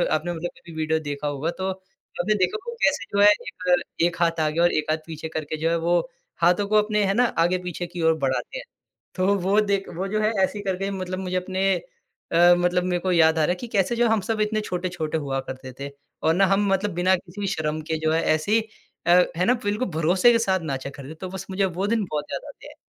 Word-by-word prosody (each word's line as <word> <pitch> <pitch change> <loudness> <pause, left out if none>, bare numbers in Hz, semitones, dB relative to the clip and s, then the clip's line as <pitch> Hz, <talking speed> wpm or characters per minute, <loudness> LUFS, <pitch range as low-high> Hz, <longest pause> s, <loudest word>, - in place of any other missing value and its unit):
आपने 170 +3 -2
मतलब 170 +1 -4
कभी 170 - -13
विडियो 160 0 0
देखा 145 -1 -4
होगा, 145 +3 -2
तो 190 +2 -3
आपने 185 +1 -4
देखा 295 - +1
होगा 470 0 -5
कैसे 280 -5 +2
जो 200 - +4
है 205 - +8
एक, 180 -3 0 0.2
एक 170 +1 +2
हाथ 165 -1 +2
आगे 155 +1 0
और 175 +1 +4
एक 155 0 -1
हाथ 155 - +1
पीछे 160 -1 -6
करके 155 -1 -4
जो 165 - +2
है 170 - +1
वो 175 +1 +2 0.4
हाथों 180 +4 +4
को 215 - 0
अपने 210 0 0
है 195 - +1
ना 245 - +3 0.2
आगे-पीछे 180 0 -1
की 175 0 -6
ओर 160 0 +4
बढ़ाते 135 - -2
हैं। - - -7 0.5
तो 195 +2 +2
वो 195 +3 +2
देख 200 -2 0
वो 190 +3 -2
जो 215 +2 -1
है 215 +1 +2
ऐसे 190 - -1
ही 205 - -6
करके 195 0 -2
मतलब 185 -1 -4
मुझे 185 -1 -3
अपने 190 +1 0 0.6
अ, 175 +1 +6
मतलब 175 0 +1
मेरे 180 -1 0
को 185 +1 -1
याद 160 -2 +4
आ - - +3
रहा 150 - +2
है - - 0
कि 235 +7 -8
कैसे 195 +5 +2
जो 240 0 +3
हम 220 -2 +2
सब 220 -2 0
इतने 215 0 0
छोटे-छोटे 175 -5 -3
हुआ 135 -3 -2
करते 130 0 -7
थे 140 0 -5 0.3
और 160 - +4
ना 195 +3 +4
हम 195 +1 +2
मतलब 200 +2 0
बिना 180 +2 +3
किसी 185 +3 -6
शर्म 155 0 -2
के 160 - +1
जो 155 0 +1
है 165 - +2
ऐसे 155 +6 -3
ही 225 - +5 0.5
अ, 180 +1 +6
है 180 - +2
ना 245 - +4
बिल्कुल 210 +4 -1
भरोसे 180 +8 +4
के 230 - +3
साथ 190 0 +2
नाचा 135 +1 -4
करते 140 0 -10
थे। 160 - -8
तो 185 +3 -7
बस 190 0 -7
मुझे 195 +1 +1
वो 190 +2 -2
दिन 225 0 +1
बहुत 150 -1 -3
याद - - -3
आते - - -13
हैं। - - -13
180 Hz, 250 wpm, -24 LUFS, 160-195 Hz, 0.6 s, है